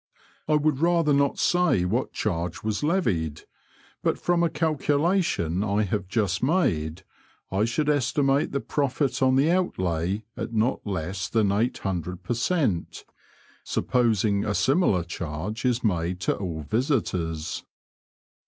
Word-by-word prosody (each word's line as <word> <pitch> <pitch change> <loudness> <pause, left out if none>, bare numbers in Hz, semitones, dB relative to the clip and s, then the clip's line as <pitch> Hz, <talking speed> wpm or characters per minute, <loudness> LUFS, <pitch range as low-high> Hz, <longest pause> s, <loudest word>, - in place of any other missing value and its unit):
I 155 - +3
would 150 -2 +1
rather 165 -2 +3
not 140 0 +2
say 170 - +2
what 115 +8 -1
chaige 85 -4 -2
^as 110 -1 -1
levied, 100 - 0 0.6
but - - +1
from 175 -1 +1
a 170 - +3
calculation 150 - +1
I 105 0 +1
have 100 -1 -2
just 100 -3 0
made, 95 - 0 0.5
I 100 +3 +2
should 140 +6 -1
estimate 140 0 +2
the 140 - -1
profit 135 -2 -1
on 130 0 +4
the 140 +5 +3
outlay 95 - 0
at - - -5
not 115 +4 +1
less 90 -1 -3
than 110 -3 +2
800 95 - -2
per 95 - -1
•cent., 120 - -1 0.6
supposing 110 -5 +1
a 105 - -1
similar 135 - +2
charge 85 - -5
is 125 -1 +1
made 90 -4 0
to - - +1
all 85 -5 -4
visitors. 90 - -1
110 Hz, 135 wpm, -25 LUFS, 90-145 Hz, 0.6 s, on